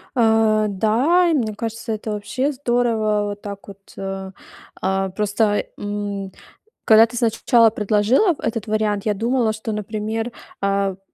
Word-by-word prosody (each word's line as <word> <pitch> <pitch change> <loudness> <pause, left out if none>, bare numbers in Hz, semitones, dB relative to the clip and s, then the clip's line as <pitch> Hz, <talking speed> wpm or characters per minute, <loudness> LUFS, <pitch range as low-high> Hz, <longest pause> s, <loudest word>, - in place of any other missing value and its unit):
А, 220 -2 +3
да, 240 - +2
и - - +2
мне 225 -7 0
кажется, 225 +1 -4
это 215 0 -4
вообще 255 +7 -2
здорово. 235 -5 0
Вот 205 0 -8
так 200 -1 -8
вот, 200 -1 -10 0.2
а, 195 0 -5 0.5
а, 190 0 0
просто, 205 +2 0
м, 205 -1 -4 0.5
когда 220 0 +7
ты 230 - -10
сначала 230 0 +4
предложила 215 - +2
в - - -16
этот 225 -2 -3
вариант, 210 -2 0
я 210 - +2
думала, 230 +2 0
что, 220 +1 -5
например, 215 +2 -3 0.3
а, 195 -1 0
в - - -32
215 Hz, 150 wpm, -21 LUFS, 205-230 Hz, 0.5 s, когда